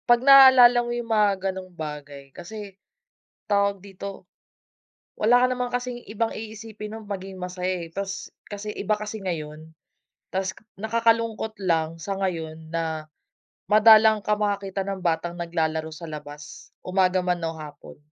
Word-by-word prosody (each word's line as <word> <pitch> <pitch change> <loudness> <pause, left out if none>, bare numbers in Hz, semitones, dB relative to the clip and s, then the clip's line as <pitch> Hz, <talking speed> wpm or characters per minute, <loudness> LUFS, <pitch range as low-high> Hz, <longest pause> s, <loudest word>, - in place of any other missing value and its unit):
'Pag 240 +1 +5
naaalala 260 -3 +9
mo 240 0 -4
yung 240 -1 -5
mga 200 -3 +2
ganung 185 -1 -9
bagay 145 -3 -8
kasi, 205 +2 -9 0.8
tawag 200 -1 +1
dito? 195 0 -8 0.9
Wala 245 +3 +4
ka 255 - +5
naman 250 -1 -2
kasing 245 -1 -3
ibang 225 +1 0
iisipin 215 -1 -8
nung 220 -1 -9
maging 190 -1 -6
masaya 180 0 -3
eh, - - -18
tas 195 +1 -5 0.2
kasi 205 +1 -7
iba 210 +2 0
kasi 210 0 -6
ngayon. 155 -3 -5 0.6
Tas 190 0 -1 0.3
nakakalungkot 225 0 0
lang 165 -2 +1
sa 195 +4 -4
ngayon, 160 -4 -4
na 160 -2 -3 0.6
madalang 215 0 +7
ka 210 0 0
makakita 200 -2 -2
ng 195 -1 -4
batang 170 0 -1
naglalaro 160 -2 -2
sa 160 +2 -9
labas, 150 -1 -10 0.2
umaga 185 0 +2
man 180 -1 0
o 165 0 -3
hapon. 150 -2 -11
195 Hz, 140 wpm, -25 LUFS, 165-215 Hz, 0.9 s, naaalala